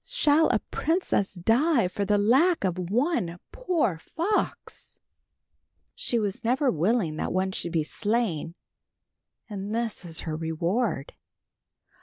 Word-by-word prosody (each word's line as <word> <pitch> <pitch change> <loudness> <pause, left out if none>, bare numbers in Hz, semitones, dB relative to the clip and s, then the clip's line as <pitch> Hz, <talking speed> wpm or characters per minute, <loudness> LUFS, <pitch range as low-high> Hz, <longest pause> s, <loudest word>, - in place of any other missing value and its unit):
Shall 320 -11 +3
a 235 - +3
princess 315 - 0
die 230 - +3
for 200 +2 -3
the 205 +1 +2
lack 265 - +3
of 180 -2 -2
one 230 - 0
poor 335 - 0
fox? 355 - -3 0.9
"She 240 - -1
was 210 +2 -2
never 255 +3 +2
willing 175 -1 0
that - - -2
one 190 +1 0
should 170 -2 -4
be 160 -2 +2
slain 200 -4 -1 0.9
and 205 0 -5
this 230 -4 -2
is 165 -2 -2
her 155 -2 -4
reward." 165 - -1
210 Hz, 125 wpm, -26 LUFS, 175-260 Hz, 0.9 s, Shall